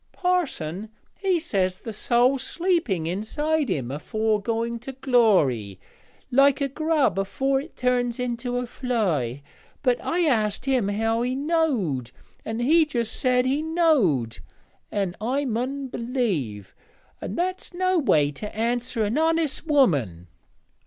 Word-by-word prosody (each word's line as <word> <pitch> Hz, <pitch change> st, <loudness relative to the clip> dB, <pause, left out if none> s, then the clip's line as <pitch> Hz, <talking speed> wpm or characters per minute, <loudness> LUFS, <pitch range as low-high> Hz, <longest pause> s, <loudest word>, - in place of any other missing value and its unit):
Parson 225 Hz, -, -1 dB, 0.3 s
he 380 Hz, -3 st, +1 dB
says 190 Hz, -, -1 dB
the 225 Hz, -, -6 dB
soäl's 245 Hz, +5 st, +2 dB
sleeping 330 Hz, -, 0 dB
inside 285 Hz, -, -1 dB
him 130 Hz, -8 st, -2 dB
afore 215 Hz, -, -1 dB
going 230 Hz, +2 st, -2 dB
to 265 Hz, +3 st, -8 dB
glory, 190 Hz, -, +2 dB, 0.5 s
like 275 Hz, +2 st, +5 dB
a 280 Hz, -, +1 dB
grub 285 Hz, -, +1 dB
afore 270 Hz, +8 st, 0 dB
it 315 Hz, -, -13 dB
turns 250 Hz, -1 st, 0 dB
into 245 Hz, 0 st, -2 dB
a 250 Hz, -, -1 dB
fly; 180 Hz, -, -1 dB, 0.4 s
but 250 Hz, -3 st, +1 dB
I 355 Hz, -, 0 dB
asked 225 Hz, -, +1 dB
him 260 Hz, -6 st, +1 dB
how 225 Hz, +3 st, 0 dB
he 250 Hz, +1 st, -1 dB
knowed, 265 Hz, -, 0 dB, 0.3 s
and 225 Hz, +2 st, -3 dB
he 320 Hz, +6 st, +5 dB
just 240 Hz, -7 st, -2 dB
said 250 Hz, -2 st, +2 dB
he 275 Hz, +3 st, +1 dB
knowed, 280 Hz, -, +2 dB, 0.5 s
an' 195 Hz, -4 st, -1 dB
I 265 Hz, +6 st, 0 dB
mun 260 Hz, +3 st, -2 dB
b'lieve, 205 Hz, -, -2 dB, 0.5 s
and 195 Hz, -, -5 dB
that's 370 Hz, +1 st, -2 dB
no 370 Hz, 0 st, +1 dB
way 150 Hz, -, +3 dB
to 210 Hz, +9 st, -8 dB
answer 235 Hz, +1 st, -1 dB
an 215 Hz, +8 st, 0 dB
honest 320 Hz, -1 st, +1 dB
woman.' 140 Hz, -, +2 dB
245 Hz, 135 wpm, -24 LUFS, 200-280 Hz, 0.5 s, like